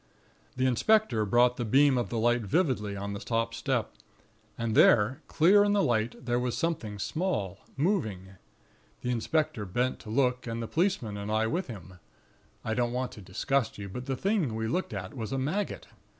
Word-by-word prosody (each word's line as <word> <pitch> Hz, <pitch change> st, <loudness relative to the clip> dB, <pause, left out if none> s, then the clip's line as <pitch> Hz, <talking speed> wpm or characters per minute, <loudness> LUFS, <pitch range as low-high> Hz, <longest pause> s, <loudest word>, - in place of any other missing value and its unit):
"The 130 Hz, -, 0 dB
inspector 130 Hz, -, +3 dB
brought 120 Hz, +4 st, +3 dB
the 120 Hz, -, -1 dB
beam 135 Hz, +4 st, +4 dB
of 120 Hz, -2 st, -1 dB
the 120 Hz, -, -3 dB
light 120 Hz, +2 st, +2 dB
vividly 105 Hz, -, 0 dB
on 100 Hz, +1 st, -4 dB
the 100 Hz, -, -5 dB
top 115 Hz, 0 st, -1 dB
step; -, -, -1 dB, 0.6 s
and 115 Hz, -1 st, -2 dB
there, 120 Hz, +7 st, +5 dB
clear 195 Hz, +6 st, +5 dB
in 205 Hz, 0 st, +2 dB
the 200 Hz, -1 st, +3 dB
light, 115 Hz, +1 st, -1 dB
there 120 Hz, -1 st, +1 dB
was 125 Hz, -1 st, -2 dB
something 125 Hz, -11 st, -2 dB
small, 100 Hz, -, -2 dB, 0.2 s
moving. 135 Hz, -, -1 dB, 0.7 s
The 125 Hz, -, -1 dB
inspector 125 Hz, -1 st, 0 dB
bent 120 Hz, +7 st, -1 dB
to -, -, -11 dB
look, 125 Hz, +1 st, +1 dB
and 115 Hz, 0 st, -3 dB
the 115 Hz, -, -3 dB
policeman 155 Hz, -, 0 dB
and 100 Hz, +1 st, -4 dB
I 110 Hz, +1 st, +2 dB
with 170 Hz, +11 st, -1 dB
him. 95 Hz, -, -10 dB, 0.7 s
I 110 Hz, -, -1 dB
don't 120 Hz, 0 st, 0 dB
want 125 Hz, 0 st, -2 dB
to 105 Hz, -, -11 dB
disgust 110 Hz, +7 st, -1 dB
you; 100 Hz, -1 st, -6 dB
but 125 Hz, +7 st, -7 dB
the 135 Hz, -1 st, -1 dB
thing 190 Hz, -, 0 dB
we 110 Hz, 0 st, -2 dB
looked 180 Hz, +11 st, -1 dB
at 95 Hz, -3 st, -5 dB
was 110 Hz, -5 st, -5 dB
a 135 Hz, -, -1 dB
maggot. 155 Hz, +10 st, -2 dB
120 Hz, 190 wpm, -29 LUFS, 110-140 Hz, 0.7 s, there